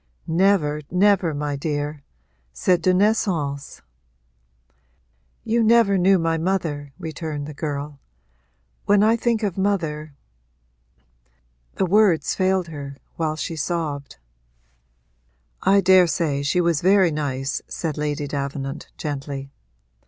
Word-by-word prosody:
'Never, 165 -4 +2
never, 190 -2 +3
my 145 -1 -3
dear: 145 0 -3 0.5
c'est 175 - +1
de 185 - +3
naissance.' 180 -8 0 1.6
'You 230 +1 +1
never 225 -3 +4
knew 190 +1 +4
my 165 -1 0
mother,' 160 -5 -2
returned 155 -2 -5
the 150 - -7
girl; 145 -1 -5 0.9
'when 205 0 +4
I 220 +2 +4
think 230 -1 0
of 195 -2 -2
mother 155 -7 -1 0.8
' - - -41
The 190 - +2
words 195 -3 +3
failed 185 -2 +1
her 140 -3 -8 0.2
while 155 -2 -1
she 155 +2 -4
sobbed. 150 - -3 1.4
'I 200 +1 +4
daresay 170 -6 +3
she 150 +6 +1
was 170 -3 +1
very 190 -1 +4
nice,' 140 -2 -2
said 160 -4 -4
Lady 150 -1 -2
Davenant 140 0 -4
gently. 140 -2 -5
155 Hz, 115 wpm, -22 LUFS, 145-190 Hz, 1.6 s, never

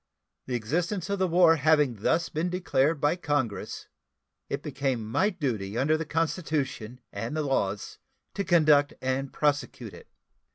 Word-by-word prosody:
The 125 - -2
existence 170 - -2
of 200 - -1
the 190 - +2
war 170 -1 +5
having 150 -5 +3
thus 165 +11 +1
been 165 +3 -1
declared 165 -4 +1
by 145 +3 +2
Congress, 145 - -2 0.6
it - - -3
became 135 -5 -2
my 190 - +1
duty 115 - -3
under 145 +5 +2
the 160 +1 -3
Constitution 150 - -2
and 115 +9 -4
the 155 - 0
laws 105 -8 -2 0.3
to 200 - -2
conduct 155 -5 +4
and 130 +1 -2
prosecute 145 -4 -1
it. - - -13
150 Hz, 150 wpm, -27 LUFS, 130-165 Hz, 0.6 s, war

